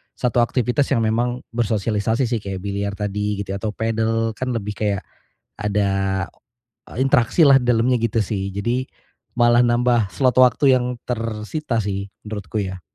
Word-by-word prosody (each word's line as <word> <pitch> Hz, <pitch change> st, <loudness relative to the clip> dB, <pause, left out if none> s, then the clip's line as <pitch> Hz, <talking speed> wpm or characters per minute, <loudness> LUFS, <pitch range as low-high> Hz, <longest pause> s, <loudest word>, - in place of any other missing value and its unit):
1 125 Hz, -1 st, 0 dB
aktivitas 125 Hz, +3 st, +1 dB
yang 115 Hz, -, +1 dB
memang 120 Hz, +3 st, 0 dB
bersosialisasi 110 Hz, +1 st, 0 dB
sih 120 Hz, -2 st, 0 dB
kayak 95 Hz, -2 st, -6 dB
biliar 100 Hz, 0 st, -3 dB
tadi 105 Hz, 0 st, -2 dB
gitu 95 Hz, -, -7 dB
ya 100 Hz, -, -3 dB
atau 105 Hz, 0 st, -4 dB
padel 115 Hz, 0 st, 0 dB
kan 130 Hz, +4 st, -5 dB
lebih 105 Hz, -1 st, -4 dB
kayak, 100 Hz, -3 st, -1 dB, 0.5 s
ada, 95 Hz, -2 st, 0 dB, 0.6 s
eee, -, -, -9 dB
interaksi 135 Hz, +5 st, +4 dB
lah 135 Hz, -2 st, +6 dB
di -, -, -4 dB
dalamnya 120 Hz, +2 st, +3 dB
gitu 115 Hz, 0 st, 0 dB
sih 100 Hz, -2 st, -1 dB
jadi, 120 Hz, +7 st, -2 dB, 0.5 s
malah 120 Hz, 0 st, +5 dB
nambah 120 Hz, -2 st, +2 dB
slot 125 Hz, +6 st, +2 dB
waktu 130 Hz, +2 st, +5 dB
yang 125 Hz, 0 st, -2 dB
tersita 115 Hz, +4 st, -3 dB
sih 100 Hz, 0 st, -3 dB, 0.2 s
menurutku 105 Hz, 0 st, -6 dB
ya. 95 Hz, -1 st, -6 dB
110 Hz, 160 wpm, -21 LUFS, 100-120 Hz, 0.6 s, lah